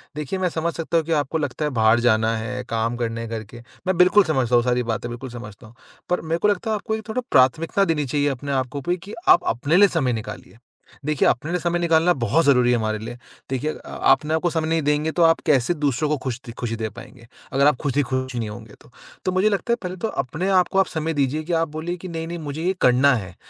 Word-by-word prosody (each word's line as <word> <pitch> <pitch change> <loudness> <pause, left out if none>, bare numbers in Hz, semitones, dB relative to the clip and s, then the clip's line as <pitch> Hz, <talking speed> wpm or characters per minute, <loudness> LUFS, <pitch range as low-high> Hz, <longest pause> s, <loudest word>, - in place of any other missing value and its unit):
देखिए 150 +5 -3
मैं 185 -1 +1
समझ 165 +1 -2
सकता 165 0 -1
हूँ 160 - +1
कि 165 - -4
आपको 155 +3 -3
लगता 145 0 -2
है 150 - -1
बाहर 110 +2 +5
जाना 115 -1 +2
है, 125 +3 -4
काम 115 +1 -1
करने 115 -1 -3
हैं 115 - -6
घर 110 -1 -4
के, 115 +3 -13 0.3
मैं 185 -2 +1
बिल्कुल 185 +3 +6
समझता 130 -7 +1
हूँ 120 - +4
सारी 125 0 +1
बातें, 115 +1 -3
बिल्कुल 125 +2 -7
समझता 110 -2 -10
हूँ। 115 - -18 0.3
पर 180 - +1
मेरे 165 +1 -1
को 210 - +2
लगता 205 +2 0
है - - +1
आपको 220 +1 -3
एक 220 0 -8
थोड़ा 250 +3 -1
प्राथमिकता 160 +9 +3
देनी 150 -4 0
चाहिए 145 +2 0
अपने 140 +1 -4
आप 135 +1 -2
पे 175 - +2
कि 200 +5 -11 0.2
आप - - +7
अपने 140 +8 +1
लिए 205 +1 +7
समय 140 -9 0
निकालिए। 110 0 -7 0.5
देखिए 150 -2 +2
अपने 155 +7 0
लिए 180 - 0
समय 175 +1 0
निकालना 170 +1 +3
बहुत 145 +8 +2
ज़रूरी 125 -3 +4
है 120 - +3
हमारे 110 -1 -1
लिए। 115 +2 -7 0.3
देखिए 135 +4 -1
अ, - - -12 0.2
अपने 155 +1 +2
आप 160 - +1
को 175 - +1
समय 160 -1 -1
नहीं 165 -1 +1
देंगे 150 +2 0
तो 170 - +2
आप 165 0 +5
कैसे 135 +2 +3
दूसरों 145 -1 0
को 150 - +1
खुश 130 -2 -3
द 115 - -7
खुशी 115 -2 -2
दे 110 -1 -3
पाएँगे। 120 +2 -13 0.3
अगर 140 +2 +4
आप 150 - +4
खुद 140 -2 -2
ही 145 - +4
खुश 130 0 -3
नहीं 115 -3 -3
होंगे 110 -1 -10
तो। - - -19 0.3
तो 185 - +1
मुझे 190 +4 +3
लगता 210 +4 -1
है - - +3
पहले 180 0 -4
तो 220 - -2
अपने 150 - -3
आप 185 -2 +4
को 195 - +2
आप 190 - +4
समय 160 0 -2
दीजिए 145 +1 0
कि 170 +2 -3
आप 165 0 +2
बोलिए 165 +4 -4
कि 185 - -9
नहीं-नहीं 165 0 -5
मुझे 150 0 -5
ये 185 +2 +1
करना 130 +3 +5
है। 95 -6 -6
145 Hz, 265 wpm, -22 LUFS, 120-165 Hz, 0.5 s, आप